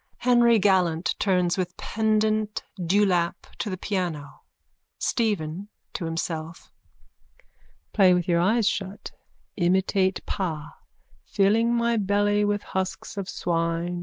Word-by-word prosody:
Henry 240 Hz, -2 st, +4 dB
gallant 185 Hz, -5 st, +2 dB
turns 180 Hz, -2 st, +1 dB
with 180 Hz, -1 st, -3 dB
pendant 215 Hz, -1 st, 0 dB
dewlap 180 Hz, -2 st, +1 dB
to 210 Hz, -, -2 dB
the 185 Hz, -, -4 dB
piano.)_ 175 Hz, -7 st, -4 dB, 0.6 s
STEPHEN: 200 Hz, -5 st, -1 dB, 0.3 s
(To 175 Hz, -, -4 dB
himself.) 165 Hz, 0 st, -5 dB, 1.2 s
Play 185 Hz, -3 st, +5 dB
with 180 Hz, 0 st, -1 dB
your 170 Hz, -1 st, +2 dB
eyes 215 Hz, +5 st, +2 dB
shut. 195 Hz, +1 st, -3 dB, 0.5 s
Imitate 190 Hz, +1 st, +1 dB
pa. 165 Hz, -7 st, -4 dB, 0.5 s
Filling 225 Hz, +4 st, +2 dB
my 235 Hz, 0 st, +1 dB
belly 205 Hz, 0 st, +2 dB
with 205 Hz, 0 st, 0 dB
husks 190 Hz, +1 st, -4 dB
of 195 Hz, -2 st, -5 dB
swine. 170 Hz, +1 st, -1 dB
190 Hz, 110 wpm, -25 LUFS, 175-210 Hz, 1.2 s, Play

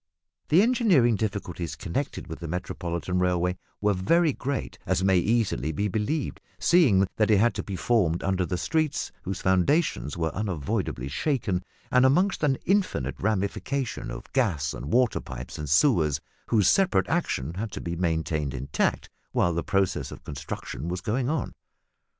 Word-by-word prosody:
The 170 Hz, +6 st, +6 dB
engineering 200 Hz, -, +4 dB
difficulties 95 Hz, -6 st, -3 dB
connected 105 Hz, +8 st, -3 dB
with 80 Hz, -, -8 dB
the 85 Hz, -, -6 dB
Metropolitan 90 Hz, +1 st, -3 dB
railway 90 Hz, 0 st, +1 dB, 0.2 s
were 105 Hz, 0 st, +3 dB
very 150 Hz, -, +3 dB
great 135 Hz, +1 st, -4 dB
as 95 Hz, -, 0 dB
may 95 Hz, -1 st, +4 dB
easily 105 Hz, -7 st, +1 dB
be 100 Hz, +7 st, -1 dB
believed, 110 Hz, -, -2 dB, 0.2 s
seeing 125 Hz, -, +4 dB
that 110 Hz, 0 st, +3 dB
it 105 Hz, -, +5 dB
had 115 Hz, +1 st, +4 dB
to 100 Hz, -, -4 dB
be 100 Hz, -, -5 dB
formed 90 Hz, -6 st, +1 dB
under 95 Hz, -1 st, 0 dB
streets 155 Hz, -, -1 dB
whose 95 Hz, 0 st, -5 dB
foundations 95 Hz, -, +2 dB
were 80 Hz, -2 st, -1 dB
unavoidably 80 Hz, -9 st, -2 dB
shaken, 95 Hz, -, -1 dB, 0.3 s
and 125 Hz, 0 st, +5 dB
amongst 180 Hz, +9 st, +3 dB
an 140 Hz, -3 st, +2 dB
infinite 185 Hz, -, 0 dB
ramification 110 Hz, +6 st, -2 dB
of -, -, -8 dB
gas 90 Hz, -, +1 dB
and 70 Hz, +6 st, -6 dB
water 125 Hz, -2 st, +3 dB
pipes 60 Hz, +2 st, -8 dB
and 75 Hz, -2 st, -4 dB
sewers 75 Hz, -, +3 dB, 0.3 s
whose 110 Hz, -4 st, +3 dB
separate 195 Hz, -1 st, +3 dB
action 85 Hz, -, -1 dB
had 105 Hz, +4 st, -4 dB
to -, -, -4 dB
be 85 Hz, 0 st, -4 dB
maintained 80 Hz, -4 st, -1 dB
intact 65 Hz, +3 st, -1 dB, 0.3 s
while 85 Hz, -, +2 dB
the 85 Hz, -, 0 dB
process 95 Hz, 0 st, 0 dB
of -, -, -10 dB
construction 70 Hz, +1 st, -6 dB
was 90 Hz, +1 st, -3 dB
going 120 Hz, +6 st, -1 dB
on. 155 Hz, -4 st, -2 dB
95 Hz, 155 wpm, -26 LUFS, 85-130 Hz, 0.3 s, The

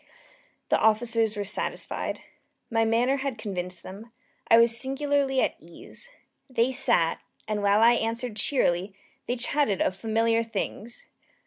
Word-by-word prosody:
The -, -, +3 dB
officers 225 Hz, 0 st, +1 dB
were 205 Hz, -, -1 dB
satisfied. 200 Hz, -, -4 dB, 0.5 s
My 225 Hz, 0 st, +2 dB
manner 240 Hz, +5 st, +2 dB
had 270 Hz, -3 st, -3 dB
convinced 180 Hz, -4 st, -5 dB
them. 210 Hz, +5 st, -11 dB, 0.4 s
I 230 Hz, -, +6 dB
was 230 Hz, 0 st, +6 dB
singularly 270 Hz, +1 st, +1 dB
at -, -, 0 dB
ease. 485 Hz, -, -13 dB, 0.4 s
They 250 Hz, 0 st, +1 dB
sat, 240 Hz, -11 st, +1 dB, 0.3 s
and 210 Hz, -1 st, -2 dB
while 205 Hz, +1 st, +3 dB
I 235 Hz, +1 st, +7 dB
answered 230 Hz, 0 st, -2 dB
cheerily, 195 Hz, -6 st, +1 dB, 0.3 s
they 245 Hz, -, 0 dB
chatted 250 Hz, -4 st, 0 dB
of 185 Hz, -, 0 dB
familiar 225 Hz, +2 st, +1 dB
things. 225 Hz, +1 st, -5 dB
230 Hz, 135 wpm, -26 LUFS, 210-250 Hz, 0.5 s, I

